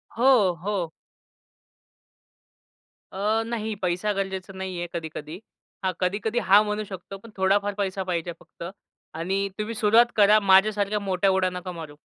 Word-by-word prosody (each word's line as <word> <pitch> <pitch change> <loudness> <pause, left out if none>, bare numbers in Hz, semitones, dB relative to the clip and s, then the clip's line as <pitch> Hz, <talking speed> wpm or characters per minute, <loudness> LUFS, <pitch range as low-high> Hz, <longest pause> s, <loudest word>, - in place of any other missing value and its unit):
हो, 235 -5 +5
हो. 195 -5 -2 2.2
अ, 215 +3 0
नाही 220 -2 -3
पैसा 180 +3 0
गरजेचा 195 -1 -4
नाहीये 185 -2 -5
कधी-कधी. 160 0 -6 0.4
हां, 190 - +1
कधी-कधी 205 +5 0
हां, 205 +2 +7
म्हणू 210 0 -2
शकतो, 195 0 -9
पण 230 +4 -14
थोडाफार 200 +2 +2
पैसा 195 -1 -2
पाहिजे 175 -2 -2
फक्त - - -13 0.5
आणि 195 +4 -1
तुम्ही 215 +2 -3
सुरुवात 225 +3 +4
करा. 210 0 +6
माझ्यासारख्या 205 +1 +3
मोठ्या 195 -1 +1
उडा 190 -1 +2
नका 180 0 -6
मारू. 160 -4 -9
195 Hz, 135 wpm, -25 LUFS, 185-210 Hz, 2.2 s, हां